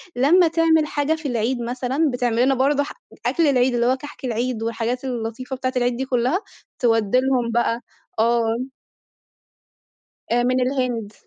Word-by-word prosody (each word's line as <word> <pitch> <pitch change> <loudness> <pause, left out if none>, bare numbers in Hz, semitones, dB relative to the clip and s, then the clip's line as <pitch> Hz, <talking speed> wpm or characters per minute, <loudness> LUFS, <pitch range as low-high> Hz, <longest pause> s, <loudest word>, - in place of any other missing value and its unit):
لمّا 330 +8 +5
تعمل 320 -1 +3
حاجة 295 +2 0
في 315 -2 -6
العيد 240 0 -1
مثلًا 255 +5 -1
بتعملنا 245 +1 +1
برضو 280 +2 +2
ح - - -7 0.3
أكل 330 -3 +2
العيد 255 -2 +3
اللي 240 0 +1
هو 260 +2 +2
كحك 290 0 -9
العيد 240 -1 -2
والحاجات 230 +2 -2
اللطيفة 245 +1 -4
بتاعة 255 0 -3
العيد 245 -1 +1
دي 265 - -2
كُلّها، 255 +6 +1 0.4
تودّي 225 -1 +3
لهم 255 -3 0
بقى، 235 0 +1 0.4
آه. 235 +2 +1 1.6
من 245 +2 +2
الهند. 250 -5 -1
250 Hz, 145 wpm, -22 LUFS, 235-270 Hz, 1.6 s, لمّا